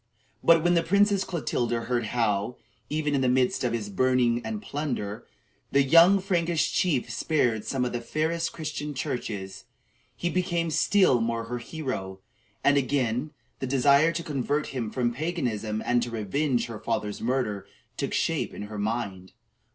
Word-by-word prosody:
But 165 -1 +6
when 175 0 +3
the 170 - +4
Princess 200 +3 +3
Clotilda 120 -8 -1
heard 120 0 -1
how, 110 0 0 0.3
even 150 -1 -1
in 140 - +2
the 130 - +2
midst 125 0 +2
of 125 - +1
his 115 -3 -2
burning 120 +3 +2
and 220 -1 -4
plundering, 140 - -4 0.5
the 140 0 +4
young 170 +7 +7
Frankish 175 -4 0
chief 150 -9 +1
spared 120 -9 0
some 130 -2 -1
of 125 - -2
the 120 - -2
fairest 160 +6 -1
Christian 150 -2 -5
churches, 100 -7 -4 0.5
he 175 - -2
became 175 -3 0
still 160 - +4
more 115 0 -1
her 120 +2 -4
hero; 120 - -5 0.4
and 145 0 +4
again 130 0 0 0.3
the 130 - -3
desire 140 +4 +4
to 170 +1 -3
convert 145 0 -1
him 120 -5 -3
from 120 0 -1
paganism 120 - -2
and 120 0 +2
to 120 - -2
revenge 120 +4 0
her 115 -3 -7
father's 105 -3 -3
murder 110 -5 -1 0.3
took - - -3
shape - - -1
in - - -6
her 105 0 -6
mind. 100 -4 -3
130 Hz, 160 wpm, -27 LUFS, 115-155 Hz, 0.5 s, young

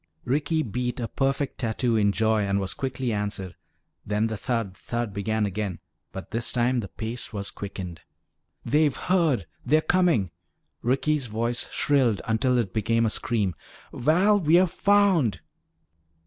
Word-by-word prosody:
Ricky 150 +5 +1
beat 125 +2 -3
a 115 - -2
perfect 135 +1 -1
tattoo 115 0 0
in 105 -2 +3
joy 110 +1 +2
and 100 0 0
was 95 -1 -2
quickly 130 -3 -2
answered. 100 -4 -3 0.5
Then 105 +1 0
the 110 0 -2
thud, 110 -3 -2
thud 115 -1 -4
began 110 +2 0
again, 100 -2 -3 0.3
but 95 - -8
this 115 +2 -1
time 125 +1 +1
the 105 - -4
pace 115 +4 -4
was 100 -3 -2
quickened. 95 -4 -7 0.6
"They've 150 -2 +3
heard! 165 - +1 0.2
They're 150 +5 +4
coming!" 160 - +2 0.5
Ricky's 135 +2 +1
voice 115 +2 -2
shrilled 130 -8 +2
until 125 +3 +1
it 110 -6 -1
became 115 +1 +1
a 110 - +1
scream. 105 -7 0 0.4
"Val, 185 +10 +3
we're 170 +2 +5
found!" 190 - +2
115 Hz, 145 wpm, -26 LUFS, 105-140 Hz, 0.6 s, we're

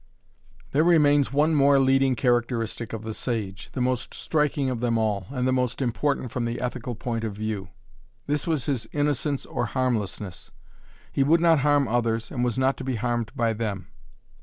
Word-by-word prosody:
There 150 +3 +3
remains 145 -5 +4
one 150 +3 +3
more 140 -1 +5
leading 135 -1 +3
characteristic 120 -2 0
of 110 -1 -5
the 110 0 -4
sage, 105 -6 -3
the 130 - -2
most 125 -1 -1
striking 150 -3 0
of 125 - -3
them 120 -1 +1
all, 105 -4 -1
and 130 -2 -1
the - - +2
most 125 -2 0
important 130 0 -1
from 125 -2 -2
the 115 0 -3
ethical 125 -1 -4
point 115 0 -3
of 110 -2 -2
view. 105 -3 -4 0.6
This 145 +2 -1
was 155 -7 0
his 135 -5 -2
innocence 145 -1 0
or 120 - -2
harmlessness. 105 -7 -2 0.6
He - - 0
would 160 +5 +4
not 165 -2 +4
harm 145 -1 +3
others 115 -1 0
and 125 -3 -1
was 125 0 0
not 130 +1 +2
to - - -6
be 130 -1 -2
harmed 120 0 -1
by 115 -1 +1
them. 105 -5 -4
125 Hz, 185 wpm, -25 LUFS, 115-140 Hz, 0.6 s, more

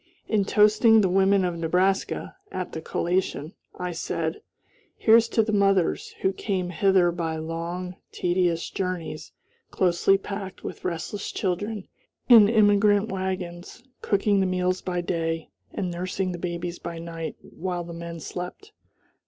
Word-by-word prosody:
In 210 -3 +2
toasting 215 +2 +5
"the 190 - +2
women 195 +1 +3
of 175 -2 -2
Nebraska," 185 - 0 0.2
at 185 -1 -4
the 160 - -5
collation, 175 -1 -1 0.2
I 180 0 -3
said: 165 -1 -3 0.6
"Here's 230 +1 +5
to 225 - +2
the 215 0 -2
mothers, 195 -3 +2
who 190 - +2
came 185 -3 -2
hither 185 0 +3
by 165 -2 -2
long, 170 +3 -4
tedious 175 -2 0
journeys, 180 -4 -4 0.4
closely 185 +2 +3
packed 195 -1 -7
with - - -7
restless 180 +4 -3
children 205 +2 -2 0.4
in 225 -5 +8
emigrant 205 -1 +4
wagons, 185 +2 -4 0.2
cooking 200 0 +2
the 190 - +2
meals 185 0 0
by 180 -1 -2
day, 165 -2 -2 0.2
and 185 -2 -3
nursing 185 +2 -2
the 175 - -6
babies 175 0 -4
by 170 - -6
night, 165 -1 -6
while 180 -1 -4
the 170 0 -8
men 170 0 -7
slept. 180 - -7
185 Hz, 140 wpm, -25 LUFS, 170-195 Hz, 0.6 s, in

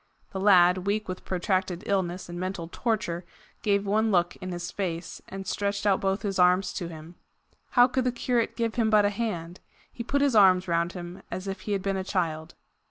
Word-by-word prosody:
The 190 - -3
lad, 185 -1 +5
weak 210 +1 0
with 185 -1 -6
protracted 185 -1 -1
illness 185 -2 -1
and 175 0 -6
mental 185 -2 -4
torture, 210 -7 -1 0.4
gave 200 -2 +1
one 215 +2 +2
look 175 -3 +2
in 185 0 -6
his 175 0 -5
face, 170 -4 -4
and 195 0 -6
stretched 200 +1 -2
out 195 -2 +3
both 195 +1 0
his 195 -2 -2
arms 180 +1 +4
to 175 - -4
him. 165 +1 -11 0.6
How 245 0 +8
could 255 0 -1
the 250 - +2
curate 240 -1 0
give 230 -2 -1
him 225 -2 +1
but 210 -1 +5
a 205 - +2
hand? 180 -6 -4 0.3
He 235 - -5
put 280 +4 0
his 275 -5 +2
arms 185 -3 +6
round 170 +1 0
him 175 0 -8
as 185 +1 -5
if 195 -1 -4
he - - +1
had 195 -2 -1
been 195 -1 0
a 190 - -2
child. 165 -5 -2
190 Hz, 210 wpm, -27 LUFS, 175-205 Hz, 0.6 s, How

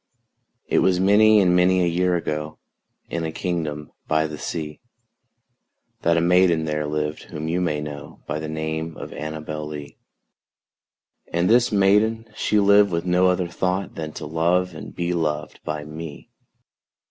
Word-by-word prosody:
It - - +2
was 90 -1 +3
many 105 +3 +6
and 90 -3 +4
many 90 +1 +4
a - - +2
year 90 +1 +1
ago, 75 -2 -3 0.5
In 85 0 -2
a 80 - -2
kingdom 80 -4 -3 0.2
by 80 0 +2
the 75 -1 -6
sea, 75 -2 -5 1.2
That 85 0 +3
a - - +3
maiden 85 -2 +4
there 75 -1 -2
lived 75 0 -3
whom 75 +1 -6
you 85 +3 0
may 75 -4 0
know 75 -1 -8
By 75 - -3
the 80 0 -5
name 80 +1 -4
of - - -8
ANNABEL 75 0 -5
LEE; 75 -1 -8 1.3
And 85 +2 +1
this 120 0 +4
maiden 105 +3 +3
she 105 - +1
lived 100 0 +5
with 85 -1 -2
no 90 +1 +3
other 90 -1 +1
thought 90 +2 -2
Than 80 -1 -5
to - - -7
love 85 +4 +1
and 80 - -9
be 85 0 -1
loved 75 -3 -2
by 75 -1 -4
me. 75 -1 -9
85 Hz, 160 wpm, -23 LUFS, 75-90 Hz, 1.3 s, many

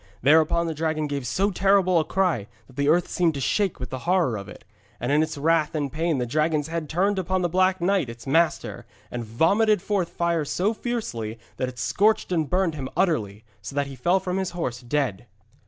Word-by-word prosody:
Thereupon 160 +4 +4
the 165 - -2
dragon 155 0 -1
gave 140 -3 -3
so 195 - +1
terrible 190 -2 +3
a - - +2
cry 170 - 0 0.2
that 130 - -19
the 140 +1 +1
earth 175 +3 +3
seemed 170 -4 +1
to - - -3
shake 195 +7 0
with 125 - -6
the 130 - -4
horror 175 -10 +2
of 100 -1 -7
it. - - -12 0.4
And - - -2
in 150 +1 +4
its 155 - -2
wrath 160 +1 +1
and 145 -3 -1
pain 160 +1 0
the 125 - -1
dragon's 155 +3 0
head 165 -2 -4
turned 195 +4 +1
upon 185 0 -1
the 175 - +1
Black 185 +2 +2
Knight 180 -6 +1
its 115 0 -10
master, 165 +5 0 0.2
and 120 -1 -4
vomited 195 - +2
forth 190 -2 -1
fire 170 -2 0
so 180 +9 0
fiercely, 130 - -4 0.2
that 130 - -1
it 125 - -12
scorched 210 - +1
and 160 -4 0
burned 180 -2 +1
him 135 -3 -5
utterly, 110 - 0 0.2
so 140 - -8
that 140 0 +1
he 140 -1 -8
fell 175 +10 +2
from 185 0 -3
his 190 -1 -1
horse 125 -7 -3
dead. 125 -5 -2
160 Hz, 215 wpm, -24 LUFS, 135-185 Hz, 0.4 s, Thereupon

